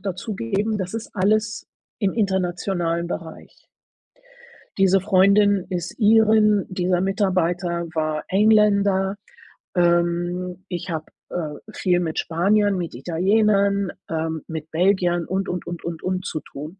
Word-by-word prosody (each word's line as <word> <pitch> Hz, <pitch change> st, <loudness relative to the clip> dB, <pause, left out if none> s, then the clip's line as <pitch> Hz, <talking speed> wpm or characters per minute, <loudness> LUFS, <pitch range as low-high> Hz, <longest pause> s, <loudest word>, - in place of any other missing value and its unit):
dazugeben, 200 Hz, -, -2 dB
das 185 Hz, +2 st, -4 dB
ist 225 Hz, 0 st, -5 dB
alles 210 Hz, +2 st, 0 dB, 0.3 s
im 195 Hz, -2 st, 0 dB
internationalen 180 Hz, -4 st, -1 dB
Bereich. 165 Hz, -2 st, -8 dB, 1.1 s
Diese 195 Hz, 0 st, +4 dB
Freundin 200 Hz, 0 st, +3 dB
ist 175 Hz, -2 st, -4 dB
Irin, 215 Hz, -1 st, +4 dB
dieser 180 Hz, -1 st, 0 dB
Mitarbeiter 180 Hz, -3 st, 0 dB
war 155 Hz, -1 st, -2 dB
Engländer, 200 Hz, -1 st, +3 dB, 0.6 s
ähm, 175 Hz, +1 st, 0 dB
ich 175 Hz, 0 st, -5 dB
habe, 160 Hz, -2 st, -3 dB, 0.2 s
äh, 155 Hz, -4 st, -4 dB
viel 180 Hz, -2 st, +1 dB
mit 160 Hz, -3 st, -3 dB
Spaniern, 200 Hz, +4 st, +2 dB
mit 170 Hz, -7 st, -4 dB
Italienern, 200 Hz, -, +1 dB, 0.2 s
ähm, 160 Hz, -1 st, -3 dB
mit 160 Hz, -1 st, -7 dB
Belgiern 175 Hz, 0 st, +2 dB
und 190 Hz, +1 st, -2 dB
und 180 Hz, -1 st, -4 dB
und 175 Hz, -1 st, -6 dB
und 170 Hz, -1 st, -5 dB
und 185 Hz, 0 st, -2 dB
zu 155 Hz, -, -3 dB
tun. 155 Hz, +8 st, -10 dB
185 Hz, 120 wpm, -22 LUFS, 170-200 Hz, 1.1 s, Diese